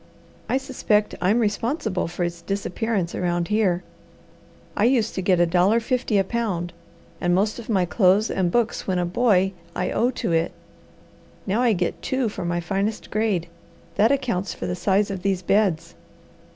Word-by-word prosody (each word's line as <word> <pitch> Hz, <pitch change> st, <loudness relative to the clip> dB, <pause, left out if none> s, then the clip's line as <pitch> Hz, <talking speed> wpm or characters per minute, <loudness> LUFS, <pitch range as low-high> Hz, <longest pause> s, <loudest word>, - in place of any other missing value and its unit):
I 260 Hz, -, +2 dB
suspect 245 Hz, -6 st, 0 dB
I'm 195 Hz, +5 st, +3 dB
responsible 220 Hz, -, -1 dB
for 175 Hz, +1 st, -3 dB
its 170 Hz, -1 st, -3 dB
disappearance 195 Hz, 0 st, -2 dB
around 175 Hz, 0 st, -1 dB
here. 195 Hz, -5 st, +1 dB, 0.9 s
I 210 Hz, -, +2 dB
used 235 Hz, -3 st, +2 dB
to 190 Hz, -, -2 dB
get 185 Hz, -1 st, +2 dB
a 175 Hz, -, +5 dB
dollar 180 Hz, +6 st, +3 dB
fifty 240 Hz, -2 st, 0 dB
a 195 Hz, -, +4 dB
pound, 190 Hz, -6 st, -2 dB, 0.5 s
and 175 Hz, 0 st, +2 dB
most 210 Hz, +5 st, 0 dB
of 235 Hz, -, -10 dB
my 190 Hz, -5 st, +2 dB
clothes 195 Hz, +3 st, +3 dB
and 185 Hz, -2 st, +1 dB
books 235 Hz, +1 st, 0 dB
when 185 Hz, -2 st, 0 dB
a 175 Hz, -, +1 dB
boy 190 Hz, 0 st, +2 dB, 0.2 s
I 180 Hz, -, -1 dB
owe 240 Hz, -, +2 dB
to 255 Hz, -, -3 dB
it. 165 Hz, 0 st, +1 dB, 0.9 s
Now 210 Hz, +4 st, 0 dB
I 240 Hz, -3 st, +4 dB
get 180 Hz, -3 st, -2 dB
two 260 Hz, -3 st, 0 dB
for 205 Hz, -, -6 dB
my 175 Hz, 0 st, -1 dB
finest 195 Hz, +5 st, -2 dB
grade; 210 Hz, -6 st, 0 dB, 0.5 s
that 215 Hz, +7 st, +3 dB
accounts 235 Hz, -10 st, -1 dB
for -, -, -5 dB
the 180 Hz, -, -2 dB
size 200 Hz, +3 st, +1 dB
of 190 Hz, -2 st, -4 dB
these 190 Hz, -1 st, -1 dB
beds." 195 Hz, -4 st, +1 dB
195 Hz, 175 wpm, -23 LUFS, 180-225 Hz, 0.9 s, a